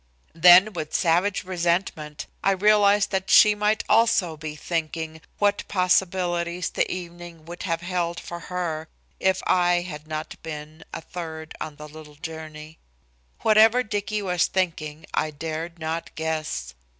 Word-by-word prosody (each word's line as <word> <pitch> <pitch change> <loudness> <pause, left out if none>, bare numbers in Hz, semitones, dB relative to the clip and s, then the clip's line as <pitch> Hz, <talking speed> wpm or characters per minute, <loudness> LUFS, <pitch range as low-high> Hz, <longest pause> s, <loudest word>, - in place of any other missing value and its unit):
Then 180 +5 +7
with 155 -3 -5
savage 180 +3 +2
resentment 170 -4 -2 0.2
I 195 - +4
realized 205 0 +4
that 190 -1 -2
she 210 -1 +8
might 210 +1 +1
also 210 -6 +3
be 155 0 -7
thinking 160 0 -4 0.2
what 205 0 +1
possibilities 180 -2 0
the - - 0
evening 175 -2 -8
would 175 +1 -9
have 165 0 0
held 175 -1 -2
for 175 - -7
her 165 -3 -4 0.3
if 190 0 +1
I 175 -1 +3
had 155 -4 -8
not 155 0 -6
been 155 0 -8
a - - -6
third 160 -2 -7
on 155 - -5
the 150 +1 -10
little 150 0 -13
journey. 155 0 -9 0.6
Whatever 220 +3 +5
Dicky 210 -1 -3
was 180 -2 +1
thinking 160 -5 -2
I 155 - 0
dared 160 +3 -5
not 160 +1 -4
guess. 155 - -3
170 Hz, 140 wpm, -24 LUFS, 155-190 Hz, 0.6 s, she